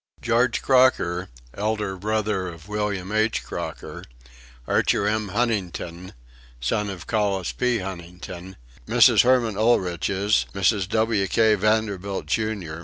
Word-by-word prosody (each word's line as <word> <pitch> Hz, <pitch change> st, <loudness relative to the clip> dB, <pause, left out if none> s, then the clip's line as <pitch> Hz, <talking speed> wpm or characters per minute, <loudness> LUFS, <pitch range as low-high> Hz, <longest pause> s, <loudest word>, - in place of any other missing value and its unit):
George 120 Hz, +2 st, +1 dB
Crocker, 125 Hz, -9 st, +3 dB, 0.2 s
elder 105 Hz, -1 st, -2 dB
brother 105 Hz, -1 st, -1 dB
of 85 Hz, 0 st, -10 dB
William 105 Hz, -2 st, -3 dB
H. 110 Hz, +1 st, +1 dB
Crocker; -, -, -7 dB, 0.6 s
Archer 100 Hz, -, +2 dB
M. 110 Hz, 0 st, 0 dB
Huntington, 95 Hz, -5 st, -3 dB, 0.5 s
son 105 Hz, -, -1 dB
of 95 Hz, -4 st, -7 dB
Collis 100 Hz, -4 st, 0 dB
P. 125 Hz, -1 st, 0 dB
Huntington; 90 Hz, -1 st, -8 dB, 0.3 s
Mrs. -, -, +6 dB
Herman 120 Hz, -4 st, +2 dB
Oelrichs, 100 Hz, -2 st, +1 dB
Mrs. 100 Hz, -1 st, +1 dB
W. 110 Hz, -2 st, +1 dB
K. 110 Hz, +3 st, +3 dB
Vanderbilt, 100 Hz, -3 st, 0 dB
Jr. 95 Hz, -3 st, -2 dB
105 Hz, 110 wpm, -24 LUFS, 95-110 Hz, 0.6 s, Mrs